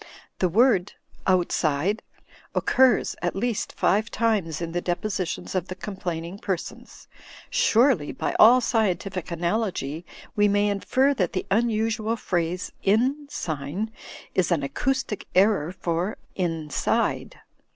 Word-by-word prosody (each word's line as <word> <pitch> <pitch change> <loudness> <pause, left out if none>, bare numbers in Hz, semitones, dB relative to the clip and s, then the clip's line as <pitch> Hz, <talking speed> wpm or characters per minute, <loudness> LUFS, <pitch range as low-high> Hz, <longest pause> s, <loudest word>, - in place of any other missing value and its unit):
The 185 - +2
word 210 -1 +3 0.3
"outside" 180 +1 +1 0.5
occurs 260 -4 +3
at 175 - -1
least 230 +2 -2
five 215 +4 +2
times 205 -9 0
in 170 -1 -4
the 175 +1 -2
depositions 185 0 -3
of 185 -1 -1
the 185 - -6
complaining 185 -2 -5
persons. 190 -5 -5 0.4
Surely 230 - +3
by - - -3
all 245 +4 +8
scientific 195 -6 -1
analogy 170 -3 -2 0.3
we 205 0 +4
may 205 0 +2
infer 260 +7 +2
that 185 -10 -1
the 185 - -2
imusual 225 0 +1
phrase 180 -2 -2
"inn 255 +9 +1
sign" 165 - -4 0.4
is 185 -1 +1
an 160 -5 +1
acoustic 245 - -2
error 190 -4 +3
for 175 +2 -2 0.2
"inside." 165 -6 -1
195 Hz, 120 wpm, -25 LUFS, 170-220 Hz, 0.5 s, all